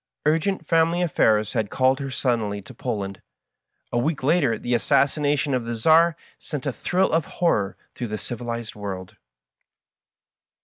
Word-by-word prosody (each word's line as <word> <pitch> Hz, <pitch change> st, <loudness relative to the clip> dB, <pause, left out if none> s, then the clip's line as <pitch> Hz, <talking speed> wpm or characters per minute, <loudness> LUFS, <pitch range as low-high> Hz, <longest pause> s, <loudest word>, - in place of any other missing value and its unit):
Urgent 165 Hz, +3 st, +1 dB
family 165 Hz, +2 st, +2 dB
affairs 110 Hz, -10 st, +2 dB
had 110 Hz, -2 st, -1 dB
called 130 Hz, +1 st, +2 dB
her 135 Hz, -1 st, -4 dB
suddenly 115 Hz, -6 st, -1 dB
to -, -, -12 dB
Poland. 100 Hz, -7 st, -4 dB, 0.7 s
A 120 Hz, -, +1 dB
week 145 Hz, +2 st, -1 dB
later 140 Hz, -6 st, +3 dB
the 120 Hz, -, -2 dB
assassination 145 Hz, -, +2 dB
of 125 Hz, -2 st, 0 dB
the 120 Hz, 0 st, -3 dB
Czar 160 Hz, +7 st, +4 dB, 0.2 s
sent 145 Hz, -4 st, -6 dB
a 140 Hz, -, -1 dB
thrill 185 Hz, -, +1 dB
of 160 Hz, -1 st, +2 dB
horror 105 Hz, -, +1 dB, 0.2 s
through 120 Hz, -, -4 dB
the 105 Hz, 0 st, -3 dB
civilized 120 Hz, 0 st, -5 dB
world. 95 Hz, -3 st, -6 dB
130 Hz, 145 wpm, -24 LUFS, 110-155 Hz, 0.7 s, Czar